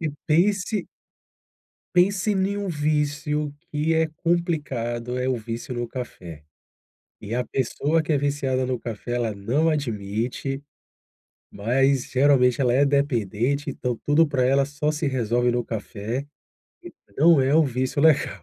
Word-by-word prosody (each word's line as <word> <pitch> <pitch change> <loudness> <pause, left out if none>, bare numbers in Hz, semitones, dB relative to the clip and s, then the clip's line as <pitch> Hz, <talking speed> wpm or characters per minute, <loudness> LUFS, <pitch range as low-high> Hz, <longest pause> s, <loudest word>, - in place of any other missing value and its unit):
E 160 -2 -1 0.2
pense 195 +6 +1 1.1
pense 190 +3 +3
em 195 +1 0
um 200 -1 -3
vício 150 -1 -1 0.2
que 150 +2 0
é 160 0 +2
complicado, 135 -9 -1
é 125 +1 -1
o 130 - +1
vício 115 +2 -6
no 120 -1 -3
café. 90 - -8 0.8
E 110 +3 -5
a 125 - 0
pessoa 145 +6 0
que 155 - -1
é - - +3
viciada 140 -2 0
no 125 -1 -2
café, 115 +1 -5
ela 115 -3 -1
não 125 +11 0
admite, 125 0 -2 0.9
mas 130 +5 +1
geralmente 130 -2 +4
ela 125 -3 +2
é 140 +3 +4
dependente 140 -1 0
então 125 -3 -3
tudo 155 +3 +4
para 130 -4 +1
ela 135 +1 +3
só 145 +2 -2
se 155 0 -2
resolve 120 -2 +1
no 120 0 0
café, 110 +3 -4 0.8
entendeu. 140 +11 +1
Não - - +3
é 135 +2 +2
um 160 0 +5
vício 130 +3 -1
legal. 140 - +3
135 Hz, 145 wpm, -24 LUFS, 120-150 Hz, 1.1 s, um